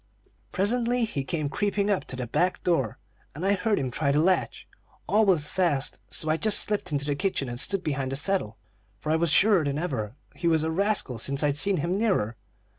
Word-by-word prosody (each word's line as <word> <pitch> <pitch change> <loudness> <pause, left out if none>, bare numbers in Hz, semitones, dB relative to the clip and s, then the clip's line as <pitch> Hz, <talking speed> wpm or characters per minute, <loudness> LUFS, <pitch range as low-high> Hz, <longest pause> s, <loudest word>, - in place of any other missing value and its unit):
"Presently 235 +4 +1
he 145 -11 -3
came 150 +2 -2
creeping 205 +5 0
up 200 - 0
to - - -5
the 125 -1 -4
back 180 +10 0
door, 135 - 0 0.4
and 165 +5 -4
I 200 - +3
heard 210 +1 0
him 130 -2 -2
try 140 +2 0
the 145 - +2
latch. 185 +4 0 0.4
All 215 0 +3
was 155 -6 +2
fast, 160 -7 0
so 160 - 0
I 155 +1 +2
just 215 +4 +3
slipped 205 -4 +1
into 145 -1 -1
the 145 - 0
kitchen 165 -3 -1
and 120 0 -5
stood 195 +4 -1
behind 140 -4 -2
the - - -2
settle, 145 - 0 0.4
for 155 - -3
I - - +3
was 165 +1 +1
surer 195 +2 +4
than 140 -1 -2
ever 120 -10 -3 0.2
he 170 - -3
was 160 -2 +3
a 160 - -1
rascal 190 - 0
since 140 +5 -1
I'd 145 -1 +2
seen 195 +3 +2
him 170 +6 -1
nearer. 155 - 0
160 Hz, 215 wpm, -26 LUFS, 140-195 Hz, 0.4 s, surer